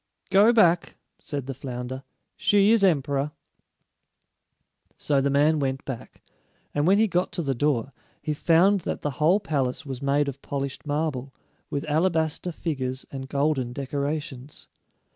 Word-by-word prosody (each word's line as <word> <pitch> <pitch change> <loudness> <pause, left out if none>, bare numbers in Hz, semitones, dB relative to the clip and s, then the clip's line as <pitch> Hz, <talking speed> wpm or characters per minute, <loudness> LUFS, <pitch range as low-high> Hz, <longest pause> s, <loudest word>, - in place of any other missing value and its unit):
"Go 200 +4 +6
back," 175 -7 +3 0.2
said 140 -4 -4
the 135 - -4
flounder. 130 0 -6 0.3
"She 205 +1 +4
is 225 -3 +4
emperor." 145 -4 +1 1.6
So 140 -2 +1
the 140 - +1
man 150 +3 +3
went 135 -1 -2
back, 130 -4 -8 0.5
and 145 +2 +1
when 195 +2 +5
he 220 +1 +4
got 180 -2 0
to 170 - -2
the 135 -2 0
door, 140 0 0 0.3
he 150 - -2
found 175 +6 +4
that - - -4
the 145 - -1
whole 175 +7 +5
palace 145 -8 -2
was 135 -2 -6
made 140 +1 +2
of 140 0 -5
polished 140 0 -4
marble, 145 -3 -2 0.3
with 140 - -2
alabaster 160 +2 0
figures 135 -6 -3
and 135 -1 -6
golden 140 -4 0
decorations. 140 0 -4
145 Hz, 145 wpm, -25 LUFS, 135-165 Hz, 1.6 s, Go